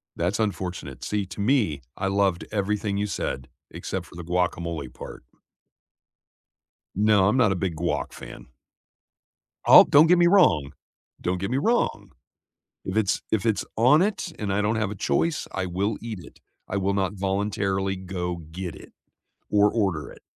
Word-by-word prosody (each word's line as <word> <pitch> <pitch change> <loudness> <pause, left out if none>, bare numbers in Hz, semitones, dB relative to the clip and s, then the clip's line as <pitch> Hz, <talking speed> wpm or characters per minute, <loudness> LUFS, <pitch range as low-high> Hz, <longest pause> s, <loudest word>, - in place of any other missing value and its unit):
That's 90 +5 -1
unfortunate. 95 -9 -3
See, 105 -1 -1
to 90 +3 -7
me, 105 - +1 0.2
I 95 - -1
loved 95 -2 +1
everything 105 0 -1
you 105 +1 -1
said, - - -4 0.2
except - - -5
for - - -16
the 85 - -7
guacamole 85 -5 -2
part. - - -10 1.7
No, 105 -1 +4
I'm 105 - +2
not 115 -6 +4
a - - 0
big 90 -2 -2
guac 85 +2 -2
fan. - - -11 1.2
Oh, - - +10
don't 150 +3 +6
get 180 +2 +5
me 175 0 +5
wrong, 80 - +4 0.5
don't 90 +1 -1
get 100 +4 -3
me 130 - +1
wrong, 230 - 0 0.7
if 95 +2 -3
it's 105 -3 +1
if 110 -2 0
it's 110 -2 +1
on 130 +8 +5
it, 195 -3 -1
and 105 -2 -3
I 105 - +1
don't 105 +2 +1
have 110 -2 -1
a - - -5
choice, 165 +10 0
I 95 -1 -2
will 100 +4 -1
eat 110 -4 -6
it. 90 - -14 0.3
I 100 - -2
will 100 0 0
not 95 0 0
voluntarily 95 0 -1
go 90 -2 -4
get 90 0 -5
it, - - -14 0.6
or 105 0 +4
order 95 -10 -1
it. - - -15
100 Hz, 170 wpm, -25 LUFS, 90-110 Hz, 1.7 s, Oh